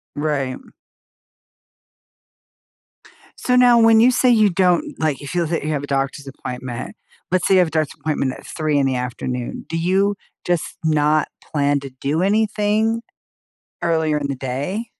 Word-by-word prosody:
Right. 145 -4 -1 2.8
So, 250 0 +1
now 245 -1 +6
when 225 -1 +6
you 250 +2 +6
say 250 0 +3
you 215 -4 +5
don't 180 -1 +1
like, 155 -5 -1
if 145 - -7
you 175 -1 +1
have 160 - -4
a - - -4
you 155 - -1
have 145 -1 -2
a - - -5
doctor's 140 0 -2
appointment. 125 -2 -7 0.4
Let's 185 -1 +2
say 195 - +4
you - - +6
have 175 - +3
a - - -8
doctor's 155 -2 -1
appointment 145 -4 -1
at - - -12
3 155 -2 -1
in 140 -1 +2
the 130 -1 0
afternoon. 125 0 -4
Do 165 - -2
you 195 +4 +1 0.3
just 175 -2 -1
not 155 0 +2
plan 145 -1 0
to 135 -1 -8
do 150 +5 0
anything 215 +2 +1 0.8
earlier 160 -2 +1
in 145 - -3
the 140 - -2
day? 140 - -3
155 Hz, 170 wpm, -20 LUFS, 140-195 Hz, 2.8 s, now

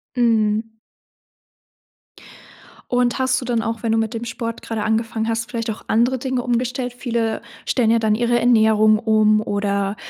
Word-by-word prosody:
Mhm. 225 -2 +1 2.2
Und, 245 0 +1
hast 260 -1 +1
du 255 - -7
dann 240 -2 0
auch, 225 0 -4
wenn 225 - 0
du 225 - +2
mit 225 +1 -2
dem 230 +1 -4
Sport 230 0 -5
gerade 225 -2 -4
angefangen 220 0 -1
hast, 230 -1 -2
vielleicht 230 -1 -3
auch 220 - -5
andere 240 +4 +2
Dinge 255 0 -2
umgestellt. 245 +1 -2
Viele 235 -3 -2 0.3
stellen 230 -3 +2
ja 230 - +3
dann 215 -1 +1
ihre 240 +1 +1
Ernährung 220 -2 +4
um, 215 -1 +3
oder 200 -1 -1
230 Hz, 160 wpm, -20 LUFS, 220-240 Hz, 2.2 s, Ernährung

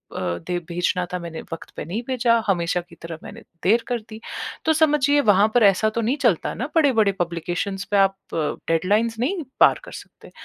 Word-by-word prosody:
अ, 90 -1 -2
दे 180 - -1
भेजना 175 +1 0
था - - 0
मैंने 170 -2 -7
वक्त 165 - -7
पे - - -5
नहीं 195 +8 -3
भेजा, 245 -2 +2
हमेशा 175 -2 +1
की 170 -1 -17
तरह 165 -1 -7
मैंने 225 +3 -10 0.2
देर 230 +4 +3
कर 245 -2 -1
दी। 220 0 -9 0.5
तो 320 - +4
समझिए 290 -2 +3
वहाँ 205 +1 +6
पर 245 - +4
ऐसा 200 +2 +4
तो 230 - +1
नहीं 240 +6 0
चलता 220 - +2
ना 245 - -4
बड़े-बड़े 250 -10 +4
पब्लिकेशंस 175 +3 -2
पे 205 - +3
आप 195 0 +4 0.2
अ, - - -2 0.3
डेडलाइन्स 210 +8 +1
नहीं 330 +7 -1 0.2
पार - - +6
कर - - -11
सकते। - - -18
205 Hz, 200 wpm, -23 LUFS, 175-240 Hz, 0.5 s, वहाँ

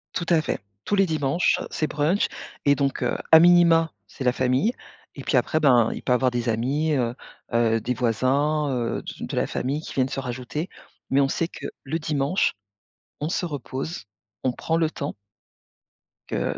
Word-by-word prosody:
Tout 170 - -1
à 165 -3 +4
fait, - - -2 0.3
tous 205 - +1
les 195 -1 +4
dimanches 155 0 +1
c'est 155 - -1
brunch 155 +7 +1 0.4
et 140 0 +4
donc, 140 -1 -1
heu, - - 0 0.2
a 160 - +12
minima 170 -1 +6 0.2
c'est 130 - -8
la 125 - +4
famille 130 - +1 0.4
et - - -8
puis - - 0
après, 155 - +1
ben, 120 -6 +5
il - - -7
peut 125 - +2
avoir 125 0 +2
des 120 0 -2
amis, 135 +8 0
heu, 120 -3 0 0.4
heu, 115 -1 +3
des 125 - -1
voisins, 135 +6 +1
heu, 120 -3 -1
d - - -7
de - - -5
la - - +1
famille 135 +4 -2
qui - - -8
viennent 130 -1 +1
se - - -3
rajouter. 130 +5 -4 0.4
Mais 135 +1 +4
on 135 - +2
sait 165 - 0
que - - -7 0.2
le 155 +4 -2
dimanche 150 +3 +1 0.7
on 150 - -2
se 175 - -1
repose, 140 - -5 0.4
on 130 - +2
prend 160 +6 -1
le 165 -2 +2
temps 145 -2 -4 1.1
que - - -2
140 Hz, 190 wpm, -24 LUFS, 125-160 Hz, 1.1 s, a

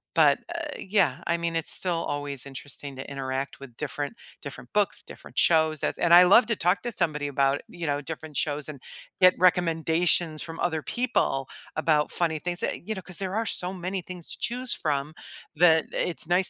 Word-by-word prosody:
but, - - +5
uh, 335 -2 -4
yeah, 190 -9 +1
I 170 - +2
mean, 170 0 -2
it's 165 - -1
still 175 -3 +3
always 145 -2 -3
interesting 140 0 -5
to 135 - -8
interact 135 0 -4
with 130 -4 -12
different 145 +5 -4 0.3
different 125 -4 -9
books, 205 -1 +1
different - - -13
shows, 160 -2 +3
that's - - -2
and 170 0 +3
I 180 - +10
love 210 +7 +7
to 230 - +1
talk 180 +2 +1
to 240 - -3
somebody 155 -7 -1
about, 140 0 +1
you 175 -6 -6
know, 145 0 0
different 155 0 -7
shows 145 -1 -1
and 145 -4 -9 0.4
get 185 0 +7
recommendations 165 -2 +2
from 165 0 -7
other 160 -3 0
people 230 - 0 0.3
about 155 -1 +2
funny 160 -3 0
things 175 +2 -3
that 175 - -3
you 220 - -2
know, 190 - -6
'cause 180 -1 0
there 190 +1 -2
are 225 - 0
so 180 -3 -1
many 185 +1 -4
things 180 -1 -10
to - - -7
choose 250 +1 -1
from 145 0 -2 0.4
that 160 -1 +5
it's 165 -2 -1
nice 180 +2 +4
165 Hz, 195 wpm, -26 LUFS, 145-180 Hz, 0.4 s, I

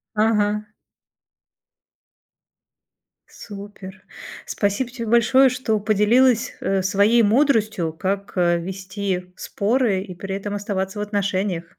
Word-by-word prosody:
Ага. 210 -1 +1 2.6
Супер. 200 -2 -11 0.4
Спасибо 205 +5 -1
тебе 235 -2 -6
большое, 240 +4 +4
что 245 -4 -1
поделилась, 230 +4 +3
э, 195 0 0
своей 205 +5 +3
мудростью, 215 - +2
как, 195 +4 -3
э, 175 -1 +2
вести 185 0 -5
споры 215 -2 0
и 190 -2 -9
при 195 +2 -6
этом 200 +1 -4
оставаться 200 -1 -3
в - - -2
отношениях. 200 -3 -2
205 Hz, 100 wpm, -22 LUFS, 190-225 Hz, 2.6 s, большое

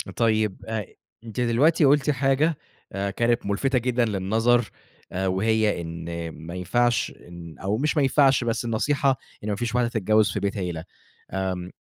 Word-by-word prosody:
طيب 110 -4 +1
أ 110 -3 -2 0.4
أنتِ 115 +1 -7
دلوقتي 140 +7 +3
قُلتِ 145 +1 +4
حاجة 140 +3 +2 0.4
آآ 100 0 -2
كانت 120 +1 +1
ملفتة 125 +6 +1
جدًا 120 0 +1
للنظر 110 +4 +1 0.4
آآ 95 +1 -1
وهي 105 0 +1
إن 85 0 -5
ما 80 +3 -9
ينفعش 120 +7 +1 0.2
إن 85 -2 -10
أو 100 +3 -1
مش 150 +5 0
ما 145 - +4
ينفعش 135 -1 +4
بس 115 0 -1
النصيحة 135 +3 +1 0.3
إن 105 - -3
ما 105 - 0
فيش 120 +2 -3
واحدة 120 -1 +2
تتجوّز 110 -1 +2
في - - -2
بيت 100 +1 -2
عيلة، 85 -4 -3 0.5
آمم 95 -1 -3
110 Hz, 160 wpm, -25 LUFS, 95-125 Hz, 0.5 s, قُلتِ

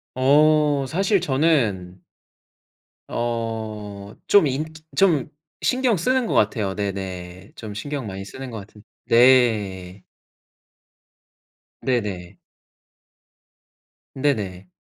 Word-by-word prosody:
어 145 +1 +4
사실 195 +3 +1
저는 120 - 0 1.1
어 110 -3 -4
좀 205 -4 +6
인 140 +3 -1 0.3
좀 170 -9 +3 0.4
신경 255 -3 +2
쓰는 250 +7 +1
것 - - -2
같아요 105 -2 +1
네네. 95 -2 -5
좀 110 -2 -8
신경 135 +5 -5
많이 95 -1 -6
쓰는 130 +4 -8
것 110 - -6
같은 105 +1 -13 0.2
네. 105 -7 +3 1.8
네네. 105 -9 -2 1.8
네네. 105 -10 -2
115 Hz, 140 characters per minute, -22 LUFS, 100-145 Hz, 1.8 s, 좀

